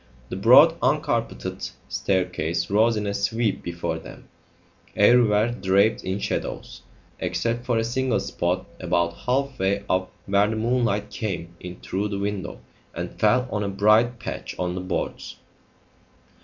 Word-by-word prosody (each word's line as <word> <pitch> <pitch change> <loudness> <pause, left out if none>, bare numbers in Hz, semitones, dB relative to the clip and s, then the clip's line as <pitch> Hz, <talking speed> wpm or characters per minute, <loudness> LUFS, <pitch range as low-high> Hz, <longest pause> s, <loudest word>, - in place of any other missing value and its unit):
The - - -4
broad - - +7
uncarpeted - - -1 0.2
staircase 90 -3 -1
rose 110 +2 +3
in 105 - -2
a 100 - -1
sweep 110 +1 0
before 85 0 -3
them, - - -13 0.7
everywhere 110 0 +4
draped 100 -1 +2
in 95 +1 -2
shadows, - - -4 0.4
except 120 +1 -2
for 120 -2 +2
a 115 - +1
single 125 -1 0
spot 95 -1 -2
about 85 -1 0
half 130 +7 -2
way 100 +1 0
up 95 0 0
where 100 +1 +3
the 110 - -2
moonlight 115 -3 0
came 85 -5 -4
in 90 0 -9
through 100 +3 -2
the 100 -1 -3
window 100 -2 -4 0.3
and - - -6
fell 125 0 +3
on 105 -1 -1
a 100 - -2
bright 110 +5 +3
patch - - -6
on 90 -1 -1
the 90 - -4
boards. 90 -1 -4
100 Hz, 145 wpm, -24 LUFS, 95-115 Hz, 0.7 s, broad